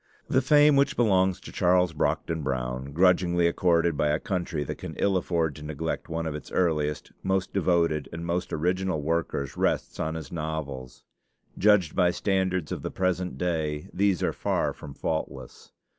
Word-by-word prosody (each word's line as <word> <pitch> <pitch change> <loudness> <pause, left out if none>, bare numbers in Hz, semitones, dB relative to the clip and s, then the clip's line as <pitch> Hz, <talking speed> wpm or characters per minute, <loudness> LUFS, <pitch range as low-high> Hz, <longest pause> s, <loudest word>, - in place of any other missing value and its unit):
The 130 - +3
fame 145 +1 +5
which 140 - +3
belongs 95 -5 +3
to - - -10
Charles 90 -1 +2
Brockden 80 +1 -1
Brown, 65 0 -3
grudgingly 85 +1 +3
accorded 85 -1 +2
by 75 - +1
a 75 +1 +1
country 90 -8 -2
that - - -6
can - - -7
ill 100 -1 +1
afford 85 -4 0
to 75 - -9
neglect 80 +3 -4
one 80 0 -2
of 80 - -2
its 75 - -8
earliest, 75 -4 0
most 95 -1 -1
devoted, 85 -6 +1
and 85 0 -6
most 85 +1 -2
original 90 +1 0
workers, 80 -4 -1
rests - - 0
on 80 +1 -2
his 80 -4 -7
novels. 75 -6 -5 0.5
Judged 100 -5 +3
by 90 -2 +4
standards 95 -3 0
of - - -3
the - - -3
present 90 -4 -1
day, 80 -3 -2
these 100 -2 +1
are - - +1
far - - -1
from 70 -2 -10
faultless. 80 +2 -5
85 Hz, 170 wpm, -27 LUFS, 75-95 Hz, 0.5 s, fame